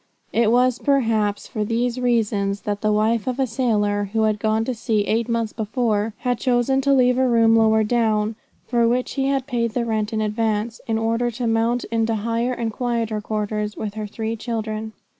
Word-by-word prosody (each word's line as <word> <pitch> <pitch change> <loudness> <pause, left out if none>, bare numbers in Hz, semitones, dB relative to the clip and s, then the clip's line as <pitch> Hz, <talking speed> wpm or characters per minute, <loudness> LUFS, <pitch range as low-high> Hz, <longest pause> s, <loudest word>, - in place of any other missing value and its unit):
It 230 -1 +3
was 250 0 +3
perhaps 225 -7 +1
for 215 -4 -3
these 235 +3 -1
reasons 210 -5 0
that 205 -1 -3
the 215 - +1
wife 215 +1 +1
of 255 +1 -2
a 265 - +3
sailor, 210 -4 0
who 220 -1 +2
had 215 -1 +1
gone 220 +1 +1
to 255 - -1
sea 220 -2 0
eight 230 +3 0
months 230 -2 -1
before, 220 -1 -1
had 245 -2 0
chosen 255 +1 +2
to 280 +1 +1
leave 250 -2 +4
a 260 - +3
room 230 -2 +4
lower 220 -1 +4
down, 215 -1 +1 0.3
for 235 -2 +2
which 250 +2 0
he 270 -1 -1
had 275 -2 0
paid 235 -4 -2
the 240 -2 0
rent 220 -2 -1
in 220 - -1
advance, 215 +1 -1
in 225 -1 0
order 230 +2 0
to 240 +1 -4
mount 230 +2 +1
into 225 0 +1
higher 230 +3 -1
and 230 -3 -3
quieter 230 -3 -2
quarters 210 0 -3
with 210 -2 -4
her 215 -1 -5
three 220 +2 -4
children. 220 -1 -4
225 Hz, 195 wpm, -22 LUFS, 215-240 Hz, 0.3 s, leave